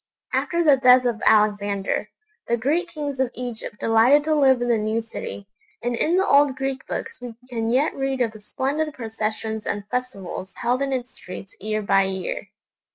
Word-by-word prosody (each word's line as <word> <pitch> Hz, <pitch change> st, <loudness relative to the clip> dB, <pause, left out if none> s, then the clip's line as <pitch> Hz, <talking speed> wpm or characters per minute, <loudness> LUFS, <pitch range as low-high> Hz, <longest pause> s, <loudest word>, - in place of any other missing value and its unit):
After 340 Hz, 0 st, +1 dB
the 290 Hz, -4 st, +6 dB
death 255 Hz, 0 st, +6 dB
of 235 Hz, -2 st, 0 dB
Alexander, 205 Hz, -1 st, +2 dB, 0.4 s
the 235 Hz, -, +1 dB
Greek 305 Hz, +10 st, 0 dB
kings 295 Hz, -5 st, -5 dB
of 265 Hz, -2 st, +2 dB
Egypt 240 Hz, -4 st, -6 dB
delighted 230 Hz, +6 st, +5 dB
to 310 Hz, +1 st, +1 dB
live 270 Hz, -4 st, +4 dB
in 245 Hz, -, -1 dB
the 235 Hz, -2 st, +3 dB
new 215 Hz, +1 st, 0 dB
city, 220 Hz, -3 st, -7 dB, 0.4 s
and 240 Hz, 0 st, 0 dB
in 330 Hz, +9 st, +2 dB
the 385 Hz, -, +3 dB
old 280 Hz, -4 st, +4 dB
Greek 270 Hz, 0 st, -3 dB
books -, -, -5 dB
we 245 Hz, -2 st, -7 dB, 0.2 s
can 225 Hz, -2 st, -1 dB
yet 265 Hz, +6 st, +2 dB
read 270 Hz, -1 st, -2 dB
of 230 Hz, -2 st, +1 dB
the 215 Hz, -, -12 dB
splendid 285 Hz, +8 st, -2 dB
processions 220 Hz, -1 st, -3 dB
and 205 Hz, 0 st, -3 dB
festivals 200 Hz, -7 st, -4 dB
held 245 Hz, +2 st, 0 dB
in 275 Hz, 0 st, 0 dB
its 255 Hz, -1 st, -2 dB
streets 185 Hz, +1 st, -10 dB
year 215 Hz, +1 st, -2 dB
by 195 Hz, -1 st, +4 dB
year. 190 Hz, +1 st, -4 dB
245 Hz, 185 wpm, -23 LUFS, 215-270 Hz, 0.4 s, the